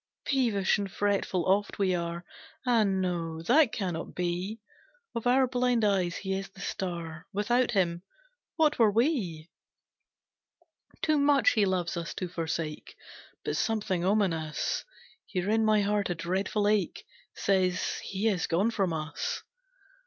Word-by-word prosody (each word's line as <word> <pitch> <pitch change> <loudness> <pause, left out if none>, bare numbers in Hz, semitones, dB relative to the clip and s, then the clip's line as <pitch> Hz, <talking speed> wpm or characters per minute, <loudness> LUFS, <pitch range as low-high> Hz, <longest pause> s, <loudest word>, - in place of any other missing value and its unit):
"Peevish 225 -8 +2
and 200 -2 -3
fretful 200 -3 0
oft 200 +2 +1
we 190 -2 +2
are, 170 0 -3 0.4
Ah, 240 -3 +4
no 175 -5 -1
that 285 - +5
cannot 185 -8 -4
be: 180 +5 -2 0.5
Of 230 +1 -2
our 260 +2 +5
blind 245 -2 +1
eyes 185 -4 +1
he 190 -1 -3
is 195 0 -3
the 195 - -17
star, 170 -4 -4
Without 235 +5 +1
him, 175 -4 +1 0.5
what 305 -4 +2
were 225 -2 +6
we? 205 - 0 1.5
"Too 310 -2 +3
much 285 -1 +4
he 210 -2 +3
loves 180 -2 -1
us 170 0 -4
to 185 - -3
forsake, 165 -2 -4 0.5
But - - -1
something 205 -6 0
ominous, 180 -6 0 0.4
Here 185 +2 -1
in 220 0 +3
my 215 -1 +4
heart, 205 -1 0
a 175 - -1
dreadful 190 +5 -1
ache, 205 -5 0 0.3
Says, 185 -2 +1
he 195 +3 -2
is 190 -6 +1
gone 195 +7 +2
from 195 -6 0
us. 155 -1 -3
195 Hz, 140 wpm, -29 LUFS, 175-220 Hz, 1.5 s, were